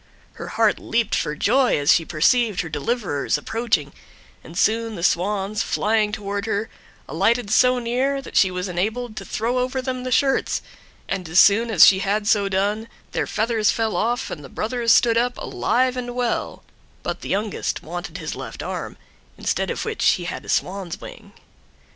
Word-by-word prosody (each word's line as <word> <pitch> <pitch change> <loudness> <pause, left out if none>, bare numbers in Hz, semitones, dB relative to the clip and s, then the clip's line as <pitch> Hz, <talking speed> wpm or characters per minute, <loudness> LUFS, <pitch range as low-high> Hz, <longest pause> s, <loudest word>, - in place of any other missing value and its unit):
Her - - -8
heart 225 -2 +2
leaped 230 -2 -1
for 150 - 0
joy 250 - +3
as 145 +2 +4
she 165 - +1
perceived 205 +6 +2
her 165 - -6
deliverers 150 - -1
approaching, 185 -4 -1 0.5
and 165 - -10
soon 225 +2 +1
the 170 - -6
Swans, 200 +4 0
flying 215 -1 +1
toward 200 0 -4
her, 215 0 -2 0.4
alighted 235 -3 +1
so 250 +3 +4
near 250 +4 0
that 270 - -10
she 190 - +5
was 180 +1 -3
enabled 215 +6 -2
to - - -6
throw 240 +3 -1
over 255 +1 -1
them 255 -1 -3
the 255 - -4
shirts, 270 +1 +1 0.4
and 185 -4 -3
as 175 +3 +4
soon 225 +3 +5
as 200 -7 +8
she 190 - +6
had 205 +1 0
so 205 -2 +3
done 205 +3 0 0.2
their - - -1
feathers 220 -1 +1
fell 220 -4 0
off 235 +6 -1
and 150 - -6
the 135 - -10
brothers 230 - 0
stood 230 -1 +5
up 245 +1 -1
alive 255 +1 0
and 245 -1 -5
well; 245 -1 -2 0.4
but - - -4
the - - -7
youngest 205 +1 -2
wanted 175 +1 -6
his 160 -3 -5
left - - -7
arm, - - -5 0.4
instead - - -1
of - - -3
which - - -3
he - - -4
had - - -5
a - - -12
swan's 185 -2 -2
wing. - - -11
215 Hz, 180 wpm, -22 LUFS, 190-240 Hz, 0.5 s, as